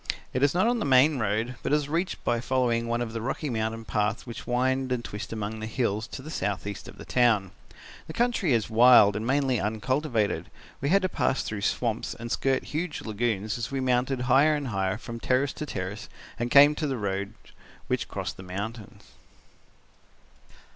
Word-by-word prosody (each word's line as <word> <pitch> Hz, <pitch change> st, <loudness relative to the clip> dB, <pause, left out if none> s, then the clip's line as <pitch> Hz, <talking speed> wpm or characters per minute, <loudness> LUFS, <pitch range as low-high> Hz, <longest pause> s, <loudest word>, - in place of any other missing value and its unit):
It 130 Hz, -, -1 dB
is 145 Hz, +3 st, +3 dB
not 185 Hz, -, +3 dB
on 240 Hz, 0 st, +2 dB
the -, -, -1 dB
main 135 Hz, +1 st, +4 dB
road, 110 Hz, +3 st, -1 dB
but -, -, -2 dB
it -, -, +5 dB
is 150 Hz, -2 st, 0 dB
reached 170 Hz, +5 st, -2 dB
by 120 Hz, -1 st, 0 dB
following 120 Hz, -2 st, +1 dB
one 120 Hz, +1 st, 0 dB
of 115 Hz, -1 st, -6 dB
the 115 Hz, -, -3 dB
rocky 135 Hz, +4 st, -3 dB
mountain 110 Hz, 0 st, -2 dB
paths 105 Hz, +1 st, -1 dB
which 115 Hz, -4 st, -8 dB
wind 130 Hz, +1 st, 0 dB
and 120 Hz, -2 st, -1 dB
twist 105 Hz, +2 st, -6 dB
among 110 Hz, 0 st, -4 dB
the 110 Hz, -, -4 dB
hills 110 Hz, -2 st, -1 dB
to 130 Hz, -, -8 dB
the 155 Hz, -, -8 dB
south 100 Hz, -10 st, -2 dB
east 100 Hz, -1 st, -6 dB
of -, -, -12 dB
the -, -, -10 dB
town. 115 Hz, -7 st, +2 dB, 0.6 s
The 160 Hz, -, -7 dB
country 235 Hz, -, +1 dB
is 115 Hz, -3 st, +2 dB
wild 115 Hz, -2 st, +7 dB
and 110 Hz, +2 st, -3 dB
mainly 135 Hz, -2 st, +2 dB
uncultivated. 110 Hz, +2 st, -1 dB, 0.3 s
We 140 Hz, -, 0 dB
had 195 Hz, +3 st, +4 dB
to 185 Hz, -, +1 dB
pass 135 Hz, -, 0 dB
through 105 Hz, -2 st, -4 dB
swamps 115 Hz, +2 st, -1 dB
and 115 Hz, 0 st, -7 dB
skirt 135 Hz, -1 st, +1 dB
huge 155 Hz, +1 st, -3 dB
lagoons 110 Hz, -1 st, -2 dB
as 115 Hz, -, -3 dB
we 135 Hz, -, -2 dB
mounted 125 Hz, 0 st, +1 dB
higher 135 Hz, +5 st, +4 dB
and 145 Hz, -3 st, -3 dB
higher 95 Hz, -1 st, -1 dB
from 115 Hz, +2 st, -8 dB
terrace 130 Hz, +3 st, +1 dB
to 150 Hz, -, -6 dB
terrace 100 Hz, +2 st, -5 dB, 0.3 s
and 120 Hz, +1 st, -1 dB
came 145 Hz, +3 st, +8 dB
to 155 Hz, -, -1 dB
the 135 Hz, -2 st, -2 dB
roads 100 Hz, 0 st, -3 dB, 0.5 s
which -, -, -1 dB
crossed -, -, -5 dB
the -, -, -9 dB
mountains. 100 Hz, +4 st, -7 dB
120 Hz, 200 wpm, -27 LUFS, 110-135 Hz, 0.6 s, came